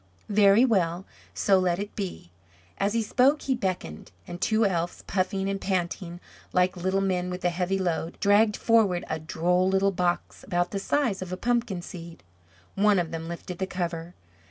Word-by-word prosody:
"Very 205 +3 +5
well; 185 -6 +1 0.3
so 195 -2 +3
let 180 -2 +1
it 205 +2 -6
be." 185 - -6 0.5
As 200 +1 +1
he 230 -1 +1
spoke 265 +7 +3
he 270 - +1
beckoned, 185 - -4 0.2
and 175 +1 -8
two 220 +2 +2
elves 175 -3 -1
puffing 190 +1 -1
and 195 0 -2
panting 175 -2 -2 0.3
like 180 +1 +2
little 190 +2 0
men 180 -2 0
with 180 0 -5
a 175 - +3
heavy 180 +2 -1
load, 175 -2 -2
dragged 210 +1 +4
forward 215 -6 +2
a 160 - -1
droll 180 +4 +1
little 195 +1 +2
box 175 -2 -2
about 175 -2 -1
the 200 - -2
size 235 -2 0
of 185 -1 -6
a 185 - -3
pumpkin 235 -5 -1
seed. 170 -2 -10 0.5
One 205 0 +3
of 170 -2 -1
them 165 0 -5
lifted 170 +1 -7
the 190 - -1
cover. 175 -2 -4
185 Hz, 180 wpm, -26 LUFS, 175-200 Hz, 0.5 s, Very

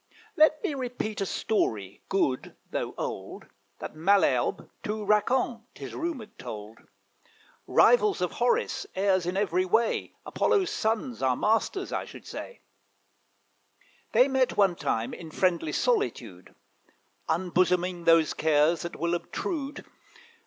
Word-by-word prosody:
Let 310 -2 +4
me - - 0
repeat 245 -6 -4
a 195 - 0
story, 105 - -1
good, 140 -10 0 0.2
though - - -3
old, - - -5 0.3
That - - -7
Malherbe 155 -7 +2
to 210 0 -3
Racan, 230 +3 +2
'tis - - -8
rumoured, 310 -11 -5
told; 110 -2 -8 0.9
Rivals 430 -5 +4
of - - -1
Horace, 470 -3 0
heirs 190 -2 +2
in 180 +2 -1
every 185 -3 +1
way, 220 +5 +1
Apollo's 400 -5 +1
sons, 225 +3 -1
our 130 -1 +2
masters, 225 - 0
I - - -2
should - - -12
say: 485 - -8 1.5
They 255 - +5
met 265 -2 +1
one 195 -4 +4
time 120 -7 -2
in 165 - -8
friendly 170 -2 0
solitude, 120 - -1 0.7
Unbosoming 180 0 +1
those 165 -2 +5
cares 155 +1 +2
that 170 - -5
will 170 +1 -1
obtrude. 285 - -4
190 Hz, 125 wpm, -27 LUFS, 160-245 Hz, 1.5 s, They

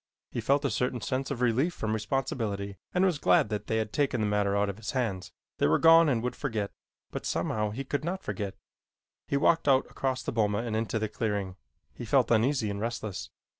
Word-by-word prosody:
He - - -3
felt 140 +1 +2
a 140 - +1
certain 125 0 0
sense 130 +3 -2
of 125 -3 -3
relief 125 +8 +2
from 110 0 -2
responsibility 110 -4 -2 0.2
and 180 +1 +3
was 175 -6 +1
glad - - +4
that 105 -1 -3
they 110 - 0
had 110 -1 -2
taken 135 -4 +1
the 110 - +1
matter 105 -1 +1
out 100 0 +2
of 100 0 -4
his 110 -1 -5
hands. 105 -8 -2 0.3
They - - +4
were 80 - +4
gone 165 -1 +7
and 120 -4 +1
would 125 - -2
forget, 110 -7 -2 0.4
but - - -5
somehow 105 -1 -1
he 120 +7 -4
could 145 +2 -2
not 185 +4 -3
forget. 100 -3 -4 0.7
He 140 - +1
walked 165 +2 +3
out 135 -1 +5
across 130 -1 -2
the - - -2
boma 105 -1 +1
and 115 -2 -2
into 110 0 -1
the 110 0 -1
clearing. 105 -3 -2 0.4
He 120 - -7
felt 125 0 +3
uneasy 115 -1 +2
and 100 0 -4
restless. 110 -4 -4
115 Hz, 215 wpm, -29 LUFS, 105-135 Hz, 0.7 s, gone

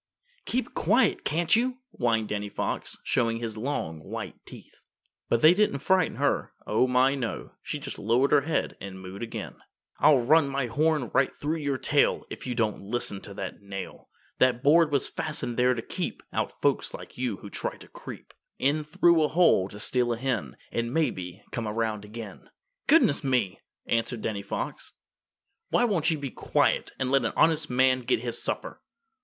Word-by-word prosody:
"Keep 255 +2 -2
quiet, - - +2
can't 170 +4 +2
you?" 250 +2 +1
whined 115 -3 0
Danny 105 0 -3
Fox, - - -3
showing 115 -1 +1
his 115 -2 -4
long 110 - -3
white - - -7
teeth. - - -13 0.5
But 115 - +1
they 160 +2 +9
didn't 205 -7 +2
frighten 185 +4 +2
her. - - 0
Oh, 115 +4 +2
my, 130 +2 +4
no! 130 -5 -4
She - - -4
just - - -7
lowered 120 +6 +2
her 145 - +6
head 160 +3 -1
and 95 -1 -7
mooed 95 +1 -9
again. 115 -1 -6 0.4
"I'll 135 -6 +5
run 155 +1 +5
my 135 -1 -1
horn 145 +1 +1
right - - +4
through 155 +3 -2
your 145 -3 -1
tail - - +2
If - - -7
you 125 - -2
don't 110 -3 0
listen 100 -2 -3
to 100 - -8
that - - -6
nail. 100 -1 -8 0.3
That 125 -1 +3
board 155 +1 +5
was 140 -2 +1
fastened 150 -6 -3
there 125 +1 +3
to 115 - -4
keep - - -4
Out - - -1
folks - - 0
like - - -11
you 120 -6 -1
who 100 - -11
try - - -4
to - - -14
creep - - -10 0.2
In 145 +3 +1
through 160 +2 +4
a 155 - +4
hole 155 - +4
to 105 - -10
steal 120 +2 +1
a - - -4
hen, 115 - -2
And 115 0 -2
maybe 95 - -2
come 115 -2 -3
around 105 -1 -2
again." 105 -1 -9 0.4
"Goodness 310 - +5
me!" 125 -8 0 0.2
answered 115 0 -1
Danny 105 -3 -2
Fox, 100 - -5 0.8
"won't 200 -10 +2
you 160 - +1
be 140 -3 -5
quiet - - +1
and 130 -1 -1
let 135 -2 +4
an 115 - -1
honest 160 -1 +3
man 130 +1 +3
get 125 -1 0
his 120 -1 -2
supper?" - - -3
125 Hz, 180 wpm, -27 LUFS, 110-150 Hz, 0.8 s, they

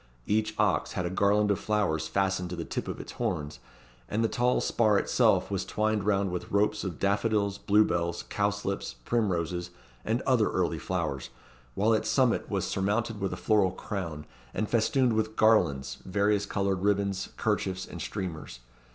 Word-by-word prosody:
Each 110 +1 0
ox - - +1
had 90 - -2
a 85 - -2
garland 100 +2 +3
of 100 - 0
flowers 90 -8 0
fastened 95 -1 0
to 90 - -4
the 85 -1 -5
tip - - -4
of - - -5
its - - -8
horns; 80 -11 -3 0.5
and 110 +2 0
the - - +3
tall 125 +2 +1
spar 110 -3 +2
itself - - +2
was - - -1
twined 110 -1 0
round 100 -2 +1
with 90 - -4
ropes 105 +1 +1
of 90 -6 -4
daffodils, 100 0 +1
blue 105 +1 +4
bells, 85 0 -1
cowslips, 100 -8 -2
primroses, 90 -6 0 0.3
and - - -1
other - - +3
early - - 0
flowers, 70 -1 -3 0.5
while 110 +3 +3
its 110 - 0
summit 130 -3 +2
was - - -1
surmounted 105 +2 -1
with 95 - -1
a - - -4
floral 105 -4 +3
crown, 85 -6 -5 0.3
and 110 - -2
festooned 120 +2 +2
with 110 0 -1
garlands, 70 - +2
various 100 +1 +1
coloured 95 -2 -1
ribands, 100 -1 0
kerchiefs, 95 -3 -1
and - - -8
streamers. 80 -9 -5
100 Hz, 170 wpm, -28 LUFS, 90-110 Hz, 0.5 s, blue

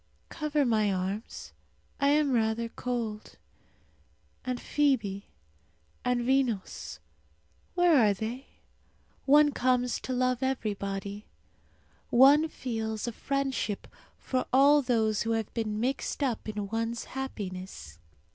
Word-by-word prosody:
Cover 300 -2 0
my 215 -4 +2
arms; 195 +4 -4 0.5
I 280 - +3
am 290 0 +3
rather 230 -1 +1
cold. 230 -4 -4 1.1
And 255 -1 -3
Fibi 225 -10 0 0.8
and 250 -1 +1
Vinos, 245 -5 -1 0.8
where 355 -2 +5
are 215 -5 +5
they? 230 +6 -5 0.8
One 295 +1 +6
comes 250 -3 +1
to - - -5
love 255 -1 +1
everybody. 205 -5 -3 0.8
One 280 +5 +6
feels 220 -6 -4
a - - -1
friendship 270 -4 -2 0.3
for 255 -1 -2
all 285 +3 +6
those 220 -5 +1
who 230 0 0
have 225 -2 -2
been 215 -2 -2
mixed 270 +4 -1
up 240 -5 -2
in 205 -2 -4
one's 230 +1 -2
happiness. 185 - -6
240 Hz, 110 wpm, -29 LUFS, 215-265 Hz, 1.1 s, One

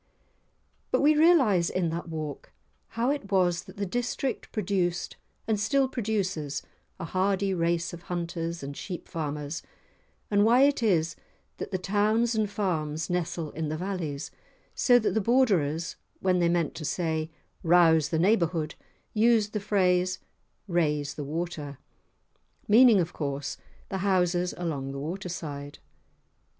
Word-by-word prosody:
But - - +2
we 300 +2 +5
realise 270 - +5
in 180 -3 0
that 170 +1 -4
walk 155 -3 -6 0.5
how 240 +4 +2
it 280 -9 -4
was 180 -3 +2
that - - -13
the 200 - -1
district 245 +5 -3
produced 180 -4 -1 0.3
and 220 -2 +1
still 270 +6 +2
produces 195 - -2 0.4
a 175 - -4
hardy 195 +2 0
race 170 0 0
of 170 - -8
hunters 170 -2 -4
and 140 +1 -6
sheep 180 +2 -6
farmers, 150 -1 -4 0.7
and 205 0 +4
why 240 +4 +5
it 280 -2 +3
is 165 -7 +2 0.4
that - - -5
the 190 - -1
towns 210 +5 +1
and 215 -2 0
farms 165 -6 -2
nestle 170 -3 -2
in 155 -1 -3
the 155 - -2
valleys, 170 -6 -4 0.4
so 245 -1 +5
that 220 - +1
the 220 - +1
Borderers, 190 - +2 0.2
when 185 -1 +2
they 170 -1 +3
meant 170 -3 +1
to 160 - -7
say, 160 0 -1 0.3
"Rouse 165 -3 +5
the 160 - 0
neighbourhood," 170 -4 +2 0.4
used 220 -1 +3
the 210 - 0
phrase, 185 -3 +2 0.5
"Raise 150 -5 0
the 150 - -5
water" 150 -2 -4 0.9
(meaning, 225 0 +7
of 175 -1 -1
course, 140 -1 -3 0.3
the 190 - -3
houses 180 -2 +1
along 140 -6 -3
the 140 - -5
waterside). 155 -3 -5
180 Hz, 140 wpm, -28 LUFS, 160-205 Hz, 0.9 s, meaning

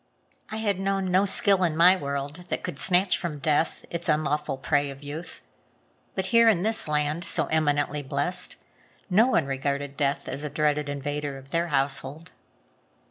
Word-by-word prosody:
I 215 - -5
had 205 -4 -1
known 195 -1 -1
no 190 +2 +4
skill 195 -1 +3
in 160 -3 0
my 180 +3 +7
world 140 +1 -5
that - - -3
could 140 - -5
snatch 185 +2 +4
from 165 -4 -4
death 150 +2 0
its 170 0 -3
unlawful 150 -2 0
prey 145 +2 0
of 135 +1 -10
youth. 150 +4 -7 0.7
But 190 - -1
here, 230 0 +7
in 185 -5 +2
this 220 -3 +2
land 150 +2 -1
so 160 -2 +1
eminently 150 -1 +1
blessed, 145 +7 0 0.6
no 215 +7 +5
one 170 - +2
regarded 140 +1 -3
death 140 -1 -1
as 140 - -3
a 150 - -3
dreaded 150 0 0
invader 145 0 -4
of 135 +1 -14
their 170 +1 0
household. 140 +1 -1
150 Hz, 170 wpm, -26 LUFS, 145-180 Hz, 0.7 s, my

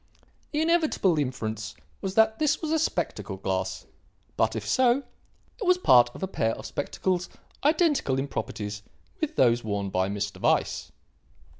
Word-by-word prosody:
The 300 - 0
inevitable 315 - +2
inference 110 -5 -3 0.3
was 195 -1 -3
that 220 0 +4
this 305 -2 +2
was 315 -2 -3
a 320 - +2
spectacle 320 - -2
glass. - - -2 0.5
But, - - +1
if - - -4
so, 260 +1 +3 0.6
it 425 - -3
was 365 0 +5
part 120 - +6
of - - -7
a - - 0
pair 115 -11 0
of - - -9
spectacles 180 +5 -2 0.3
identical 295 - +2
in 135 +1 -1
properties 105 -5 -4 0.4
with 310 -1 -2
those 120 -1 +3
worn 100 -2 -2
by 95 +1 +1
Mr. 100 0 -4
Weiss. - - +1
180 Hz, 155 wpm, -27 LUFS, -, 0.6 s, part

